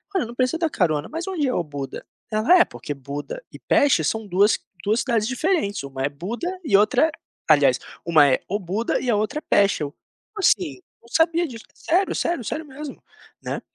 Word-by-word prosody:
Olha 380 - +2
eu - - -5
não 235 - -10
preciso 255 +6 0
da 330 - +1
carona, 155 - 0
mas 330 +3 -4
onde 355 -6 -1
é 250 - 0
Obuda?" 145 -5 -4 0.3
Ela: 220 +12 +5
"É - - +8
porque 145 - -6
Buda 145 - -7
e - - -11
Peste 280 - +3
são 220 +8 -1
duas 200 +3 +3 0.3
duas 215 +4 +2
cidades 230 -5 0
diferentes, 255 - 0
uma 135 -1 -5
é 140 - +1
Buda 200 - -5 0.2
e 205 -11 +4
outra, 260 +10 +3 0.4
aliás, - - +5 0.3
uma 160 -4 +6
é 130 - +3
Obuda 205 +3 -1
e 250 - -2
a 225 - +3
outra 215 +8 -1
é - - -17
Peste." 200 -5 +3
Eu: 145 0 -5 0.4
"Assim, 175 - +2 0.2
não 235 - -20
sabia 330 +3 +2
disso, 230 -4 -10
sério, 370 +4 0
sério, 340 -8 -1
sério 315 - -3
mesmo, 290 0 -9 0.4
né." - - -4
220 Hz, 195 wpm, -23 LUFS, -, 0.4 s, É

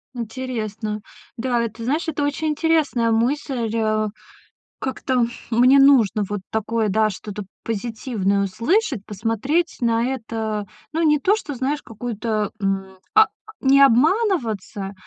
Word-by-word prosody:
Интересно. 220 -3 -4 0.4
Да, 240 0 0
это, 230 0 -5
знаешь, 300 +9 -1
это 295 -2 -1
очень 290 +2 -1
интересная 300 -7 +1
мысль. 245 +1 0 1.1
Как-то 260 -2 0 0.2
мне 250 +4 +5
нужно 250 -7 +5
вот 205 -1 -3
такое, 220 0 0
да, 215 +2 +3
что-то 205 +1 -6 0.2
позитивное 220 -3 -1
услышать, 235 - 0
посмотреть 225 - -1
на 230 0 +2
это, 220 -4 -4 0.3
ну, 325 - 0
не 300 -2 +4
то, 390 +9 +3
что, 300 -10 -6
знаешь, 275 +4 -1
какую-то, 220 -2 -3
м, 195 -1 -2 0.2
а, 435 0 +8 0.3
не 275 +1 +5
обманываться, 245 - +2
235 Hz, 120 wpm, -22 LUFS, 215-275 Hz, 1.1 s, а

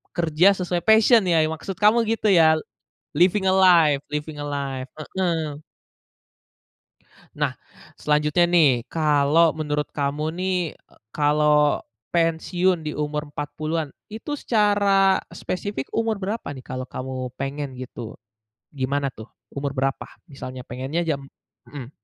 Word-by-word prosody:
kerja 170 +3 +4
sesuai 180 -1 -2
passion 220 +1 +6
ya 160 -2 +4
maksud 160 +4 -5
kamu 210 +2 +5
gitu 225 -1 0
ya? 160 -3 +6 0.6
Living 180 +5 +3
a - - +3
life 170 -7 +5
living 150 +1 -4
a - - -4
life, 135 -2 -4 0.3
heeh. 165 -6 -1 1.7
Nah, - - -1 0.4
selanjutnya 150 +3 +2
nih 170 -4 +5 0.2
kalau 155 +1 +3
menurut 150 -1 -2
kamu 145 +1 -2
nih, 185 0 0 0.2
eee, - - -27 0.2
kalau 150 0 +3 0.3
pensiun 175 +2 +1
di 150 - -4
umur 150 0 -3
40-an 155 +1 -4 0.2
itu 225 +8 -6
secara 200 -3 +3 0.2
spesifik 185 -6 -4
umur 225 -1 0
berapa 205 +3 -4
nih 130 - -10
kalau 130 0 -5
kamu 130 -1 -5
pengen 140 +1 -3
gitu? 125 -3 -8 0.6
Gimana 140 0 -1
tuh 110 -3 -11 0.2
umur 140 0 -4
berapa 135 0 -1 0.2
misalnya 130 -2 -8
pengennya 130 +7 -3
jam 145 -5 -2 0.4
mhm. 135 -4 -9
155 Hz, 125 wpm, -23 LUFS, 140-180 Hz, 1.7 s, passion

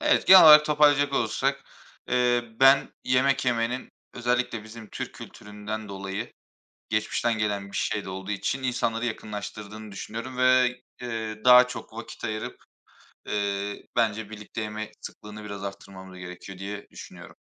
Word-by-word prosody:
Evet 300 0 +2
genel 190 -1 +10
olarak 150 -1 +10
toparlayacak 145 -2 +3
olursak, - - 0 0.5
eee, 125 -1 +2 0.2
ben 135 +1 +6
yemek 135 +2 +2
yemenin 120 0 -1 0.3
özellikle 125 -2 -1
bizim 110 0 -11
Türk - - -6
kültüründen 105 +1 -8
dolayı 100 +3 -5 0.6
geçmişten 110 +1 0
gelen 100 -2 -2
bir - - -5
şey 105 - -1
de - - -8
olduğu 95 +1 -6
için 130 +6 -2
insanları 120 -2 -1
yakınlaştırdığını 105 -1 -7
düşünüyorum 115 +6 -7
ve, 125 -1 +4 0.2
eee, 110 -2 -4
daha 125 0 +8
çok 125 - -8
vakit 115 +1 -9
ayırıp, 110 -1 -4 0.7
eee, 100 0 -2
bence 110 -2 0
birlikte 110 +1 -7
yeme 110 0 -5
sıklığını 105 0 -10
biraz 100 -1 -7
arttırmamız 95 -1 -9
gerekiyor 90 +1 -9
diye 100 +1 -6
düşünüyorum. - - -12
110 Hz, 135 wpm, -26 LUFS, 105-125 Hz, 0.7 s, genel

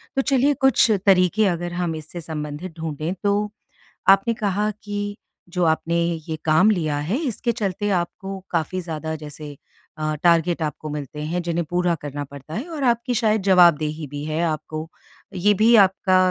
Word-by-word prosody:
तो 270 - +3
चलिए 275 +1 +3
कुछ 265 -3 +5 0.2
तरीके 195 +2 +4
अगर 175 -1 -2
हम 175 -2 -2
इससे 160 +2 -8
संबंधित 155 +2 -6
ढूँढे 160 0 -3
तो 205 +1 +1 0.6
आपने 195 +4 +5
कहा 210 -1 0
कि 205 0 -4 0.3
जो 180 0 -1
आपने 165 +1 +1 0.3
ये 160 - -2
काम 160 +6 +5
लिया 155 -7 0
है 165 - -1
इसके 240 -1 -1
चलते 205 -3 -2
आपको 190 +3 -5
काफ़ी 175 +2 -1
ज़्यादा 160 -2 -4
जैसे 150 -1 -9 0.4
अ, 155 0 -1
टारगेट 170 0 +3
आपको 155 0 -3
मिलते 150 0 -6
हैं 175 +3 -2
जिन्हें 170 0 -2
पूरा 175 0 +1
करना 145 0 -5
पड़ता 140 +2 -11
है 245 - -4
और 310 -4 -4
आपकी 240 0 +1
शायद 220 -2 +2
जवाबदेही 165 -5 +4
भी 145 +1 -6
है 155 +1 -1
आपको। 155 0 -4 0.5
ये 200 +3 +3
भी 220 +4 +5
आपका 190 -2 +4
175 Hz, 165 wpm, -22 LUFS, 155-205 Hz, 0.6 s, कुछ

